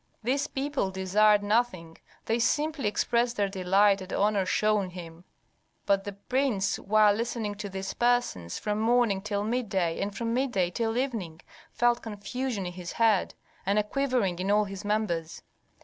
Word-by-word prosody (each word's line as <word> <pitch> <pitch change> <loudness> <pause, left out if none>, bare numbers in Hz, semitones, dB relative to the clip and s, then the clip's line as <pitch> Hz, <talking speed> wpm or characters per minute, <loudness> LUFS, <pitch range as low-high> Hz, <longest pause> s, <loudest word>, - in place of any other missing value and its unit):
These 270 +5 0
people 275 -6 -2
desired 205 +2 +3
nothing, 205 -7 -1 0.3
they 225 +1 0
simply 295 +1 0
expressed 235 +3 +1
their 205 -1 +2
delight 195 +1 +3
at 185 - -8
honor 200 -2 +1
shown 210 -1 +1
him. 175 -1 -10 0.6
But 195 -1 +2
the 205 - -5
prince, 235 0 -1
while 210 0 +4
listening 225 -1 -2
to 205 - -5
these 195 0 -5
persons 240 - 0
from 210 0 -2
morning 225 -3 +2
till 205 0 -2
midday 200 -7 -1
and 200 0 -3
from 230 -1 -2
midday 240 -9 0
till 225 +4 -1
evening, 220 -11 -3 0.3
felt 240 0 +2
confusion 225 0 -4
in 175 - -5
his 175 -1 -7
head, 225 -4 +2 0.3
and 200 +2 +1
a 210 - +3
quivering 245 -7 0
in 190 +2 -2
all 210 +1 +4
his 195 0 -7
members. 205 -6 -2
210 Hz, 160 wpm, -28 LUFS, 190-235 Hz, 0.6 s, while